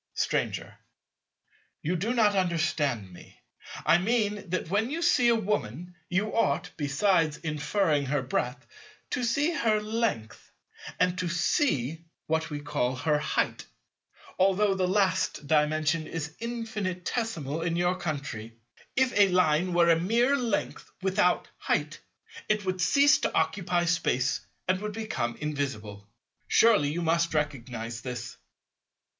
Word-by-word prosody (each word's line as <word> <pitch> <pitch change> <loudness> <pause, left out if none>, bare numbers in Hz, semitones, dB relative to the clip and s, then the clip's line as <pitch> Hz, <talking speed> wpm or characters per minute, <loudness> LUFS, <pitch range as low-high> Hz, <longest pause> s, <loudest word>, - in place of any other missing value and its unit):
Stranger. - - -2 1.0
You 175 +4 0
do 200 +7 -1
not 220 -4 +3
understand 155 - 0
me. - - -15 0.5
I 170 - +5
mean 210 -1 0
that 185 -1 -2
when 205 +7 0
you 315 +4 -3
see 255 -8 +4
a 235 - +5
Woman, 180 - -2 0.2
you 195 +4 0
ought—besides 155 -1 +1
inferring 150 -1 0
her 140 0 0
breadth—to 130 - -5
see 285 +8 +1
her 225 -7 +2
length, 210 - -3 0.5
and 180 0 +2
to 180 -2 -1
see 170 - 0 0.2
what 160 0 -1
we 145 -1 -5
call 130 -3 -1
her 150 +3 +1
height; - - -1 0.7
although 195 +2 +3
the 185 -1 0
last 190 -5 +1
Dimension 155 +1 +1
is 160 0 -5
infinitesimal 210 - -3
in 165 0 -1
your 175 +1 +1
country. 140 -10 -5 0.4
If 260 -1 +2
a 205 -1 +6
Line 180 -1 +2
were 170 -1 +5
mere 230 +11 +2
length 240 -6 -2
without 190 -1 +2
"height," - - -1 0.5
it 210 -2 +1
would 185 -1 -1
cease 280 - +5
to - - -1
occupy 175 -2 +1
Space 135 -6 +1 0.3
and 185 +1 +1
would 210 0 -4
become 200 - -3
invisible. 120 -9 -4 0.4
Surely 215 -11 +4
you 170 +4 -2
must 170 0 +1
recognize 120 -6 -3
this? 120 -2 -6
175 Hz, 125 wpm, -28 LUFS, 150-210 Hz, 1.0 s, a